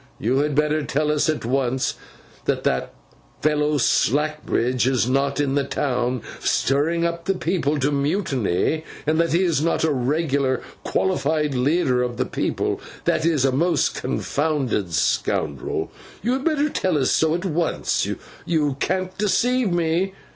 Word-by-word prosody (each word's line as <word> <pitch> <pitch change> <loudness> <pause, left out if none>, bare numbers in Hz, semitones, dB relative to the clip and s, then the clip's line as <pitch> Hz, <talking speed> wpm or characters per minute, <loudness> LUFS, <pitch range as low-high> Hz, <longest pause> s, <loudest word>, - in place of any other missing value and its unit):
You 125 +6 +1
had 145 0 0
better 150 +1 +2
tell 150 +2 0
us 150 +1 +1
at 155 -6 -1
once, 130 +1 0 0.5
that - - 0
that 65 0 0 0.5
fellow 150 0 +2
Slackbridge 135 -3 +1
is 130 -3 +2
not 140 +2 +1
in 140 -2 +1
the 140 0 +2
town, 125 -3 -1 0.2
stirring 160 +5 +1
up 170 0 -3
the 195 - +1
people 165 -4 0
to 140 +1 +1
mutiny; 145 - 0 0.2
and 155 +1 +1
that 170 0 +2
he 175 +3 +3
is 165 -6 +1
not 165 +1 +1
a 160 - +3
regular 140 0 0 0.2
qualified 155 -5 0
leader 130 0 +2
of 120 -1 -2
the - - 0
people: - - -2 0.2
that 160 - +2
is, 150 -5 +2
a 135 - +3
most 170 +7 +1
confounded 135 - -1
scoundrel. 70 -3 -1 0.3
You 240 +3 +1
had 265 +1 -2
better 300 -2 +2
tell 185 - 0
us 130 -3 +2
so 160 0 +2
at 175 +2 -3
once; 170 -1 0 0.4
you 150 -5 0
can't 185 +2 -1
deceive 240 +2 +2
me. 175 +3 +1
150 Hz, 155 wpm, -22 LUFS, 135-170 Hz, 0.5 s, he